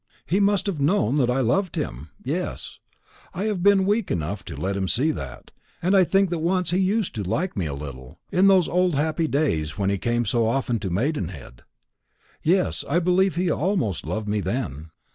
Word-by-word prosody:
He 185 +5 +1
must 200 -1 +2
have 185 -8 -2
known 145 - +2
that 125 -4 +2
I 130 +2 +1
loved 185 - +1
him 75 - -4
yes, - - -4 0.6
I 185 - -2
have 210 -4 -1
been 195 0 +5
weak 205 +1 +1
enough 85 +4 -2
to - - -7
let 95 +1 -1
him 95 -1 -1
see 140 +11 +2
that 70 - -8 0.3
and 185 +3 +2
I 190 - +7
think 195 +1 +2
that 170 - -1
once 180 +1 0
he 180 - +2
used 195 +2 +1
to 105 - -3
like 165 - -2
me 90 -5 -1
a 70 - -4
little 70 -3 -9
in 190 +2 +4
those 190 -4 +5
old 180 -2 +1
happy 160 +3 0
days 135 - 0
when 100 -1 +1
he 100 - -1
came 120 +2 0
so 115 +2 +1
often 120 -1 0
to 100 - -3
Maidenhead. 90 - -3 0.8
Yes, 180 +3 +1
I - - +2
believe 180 0 +2
he 180 -1 +1
almost 155 - 0
loved 105 +7 -3
me 105 +1 0
then." 95 - -3
150 Hz, 200 wpm, -24 LUFS, -, 0.8 s, I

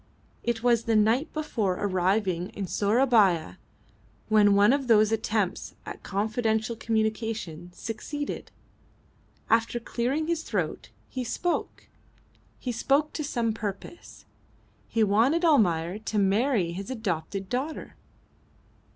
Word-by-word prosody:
It 235 -1 -2
was 235 -2 +3
the 225 - +2
night 225 +8 +3
before 230 -12 -1
arriving 185 -1 0
in 200 - -3
Sourabaya 205 -4 +2 0.7
when 205 -2 +5
one 205 +5 +5
of 275 -2 -1
those 215 -2 +5
attempts 215 -3 -1
at - - -8
confidential 220 +2 -1
communication 220 -6 -2
succeeded. 285 +9 -5 1.0
After 230 +1 +2
clearing 250 +6 -1
his 335 0 -1
throat 185 - -3 0.2
he 255 - -4
spoke. 345 +8 -3 0.7
He 250 - -4
spoke 275 +6 +1
to 305 - -3
some 235 -6 -1
purpose. 210 - -7 0.6
He 225 - +1
wanted 235 - +3
Almayer 185 - +3
to 220 0 -3
marry 200 -1 +2
his 195 +3 -6
adopted 195 -5 -3
daughter. 265 +9 -4
220 Hz, 115 wpm, -27 LUFS, 200-245 Hz, 1.0 s, when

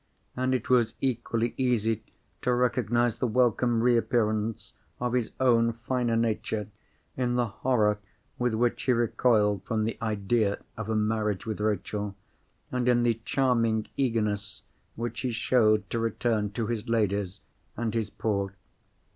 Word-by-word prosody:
And 130 +1 +1
it 125 - -3
was 120 -3 +3
equally 120 -2 -1
easy 115 -4 +1 0.4
to 125 - +1
recognise 120 -1 +1
the 125 - 0
welcome 120 0 +2
reappearance 115 -3 +1 0.3
of 125 0 -1
his 125 -3 +1
own 115 -3 +4
finer 120 0 -1
nature 110 -2 -1 0.5
in 125 -1 0
the 125 -1 +2
horror 110 -2 +1 0.4
with 125 -2 +1
which 120 +1 +1
he 130 - +2
recoiled 110 -4 +2
from 110 0 -1
the 115 - -3
idea 105 -1 +1 0.2
of 110 -1 -5
a 110 - +1
marriage 105 -2 0
with 110 -2 -3
Rachel, 105 -1 -2 0.6
and 125 -1 +1
in 120 -1 +4
the 115 -1 +1
charming 115 -5 +1
eagerness 105 -5 -1 0.3
which 115 0 -4
he 125 - -1
showed 110 -2 +3
to 115 - 0
return 115 -2 0
to 115 +1 -1
his 115 -1 -3
Ladies 100 -4 0 0.4
and 115 -1 -1
his 110 -3 -1
Poor. 100 -3 -2
115 Hz, 145 wpm, -28 LUFS, 105-120 Hz, 0.6 s, own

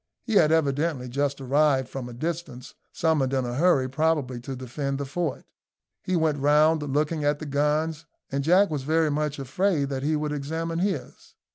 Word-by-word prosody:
He 225 - -4
had 160 -6 +5
evidently 145 -3 +1
just 140 +2 -1
arrived 135 0 +2
from 130 -2 -6
a - - -9
distance, 150 -2 -5 0.2
summoned 150 -5 +1
in 130 -2 +1
a 120 - -3
hurry, 140 -2 +3
probably, 140 -3 0
to 130 +2 -6
defend 135 +2 -4
the 140 - -3
fort. 160 +2 -3 0.6
He 185 - -1
went 160 -3 +1
round, 150 +3 +4
looking 150 +2 -1
at 145 0 +2
the 155 - -7
guns, 150 +2 0 0.2
and 140 0 -1
Jack 180 +5 +4
was 150 -3 -2
very 155 +2 +1
much 150 0 -1
afraid 145 +2 0
that 135 -1 -3
he 155 +3 +1
would 150 0 -2
examine 160 +3 -3
his. 185 -7 -4
150 Hz, 180 wpm, -25 LUFS, 135-160 Hz, 0.6 s, had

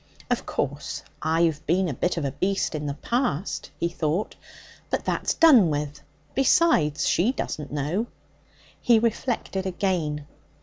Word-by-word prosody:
'Of - - 0
course, - - -3 0.2
I've 160 -1 +1
been 180 +3 +2
a 150 - -2
bit 175 +7 -1
of 155 - -1
a 135 - -1
beast 195 +6 -1
in 150 -1 -3
the 140 - -3
past,' 205 - -2
he 170 - +1
thought. 170 +3 -2 0.5
'But - - -2
that's - - 0
done 260 - +7
with. 150 0 -3 0.3
Besides, 265 - +3
she 195 +9 +3
doesn't 150 - -4
know.' 150 +11 -1 0.7
He 235 -2 +5
reflected 220 -4 -1
again. 175 -6 -1
170 Hz, 140 wpm, -25 LUFS, 150-215 Hz, 0.7 s, done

